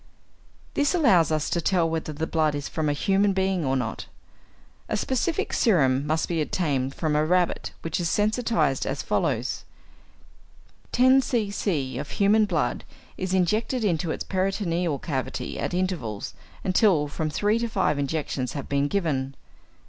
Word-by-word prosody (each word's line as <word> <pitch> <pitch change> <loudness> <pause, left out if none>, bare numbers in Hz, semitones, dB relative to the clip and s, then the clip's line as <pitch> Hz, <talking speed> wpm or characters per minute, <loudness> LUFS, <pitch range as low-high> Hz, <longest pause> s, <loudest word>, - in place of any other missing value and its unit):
= - - -31
This 290 +5 +2
allows 190 - +4
us 155 -1 0
to 170 - +1
tell 170 0 +2
whether 160 -1 -3
the 155 +2 -3
blood 155 -2 +1
is 145 0 -4
from 155 -2 -1
a - - +2
human 195 +6 +2
being 190 -2 0
or 135 -1 +1
not. 110 -3 -4 0.8
A - - 0
specific 265 +5 -1
serum 140 - +3
must 160 +1 0
be 165 -2 -1
obtained 140 -5 -1
from 155 -2 -1
a 150 - +3
rabbit 180 +2 +1
which 165 +1 -2
is 170 -2 0
sensitized 215 - +1
as - - -2
follows: - - -1 1.3
10 260 +2 +5
c.c. 200 - -1
of 145 - -6
human 210 +2 +3
blood 160 -11 -1 0.3
is 185 0 -2
injected 215 +7 +1
into 170 -5 0
its - - -2
peritoneal 180 -4 -1
cavity 135 -2 -4
at - - -2
intervals, 175 - -2 0.3
until 185 -6 +3
from 155 +2 -3
three 210 +8 +1
to 235 - -1
five 150 -9 0
injections 140 -3 -2
have 140 - -5
been 140 0 +1
given. 140 -7 -1
170 Hz, 155 wpm, -25 LUFS, 145-200 Hz, 1.3 s, 10